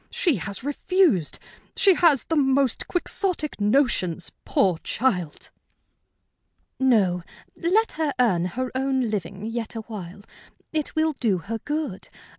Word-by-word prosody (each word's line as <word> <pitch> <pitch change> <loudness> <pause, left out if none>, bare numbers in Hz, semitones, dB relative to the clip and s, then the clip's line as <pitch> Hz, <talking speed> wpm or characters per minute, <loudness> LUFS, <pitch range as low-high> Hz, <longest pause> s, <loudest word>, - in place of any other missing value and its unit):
She 335 - +1
has 200 +4 -5
refused. 290 - +2 0.4
She 390 - +5
has 330 -7 +4
the 325 - -2
most 270 -3 +2
Quixotic 355 - -1
notions, 205 - +1
poor 180 -4 +2
child!" 180 - -2 1.3
"No, 210 -9 +3 0.3
let 415 +7 +2
her 315 -2 +1
earn 185 -9 +3
her 250 +8 -3
own 260 -3 0
living 195 0 -4
yet 230 0 -4
awhile. 205 -4 -7 0.5
It 310 -2 -2
will 315 0 +2
do 215 -6 +2
her 225 +6 -5
good. 295 -8 -4
245 Hz, 120 wpm, -24 LUFS, 195-300 Hz, 1.3 s, She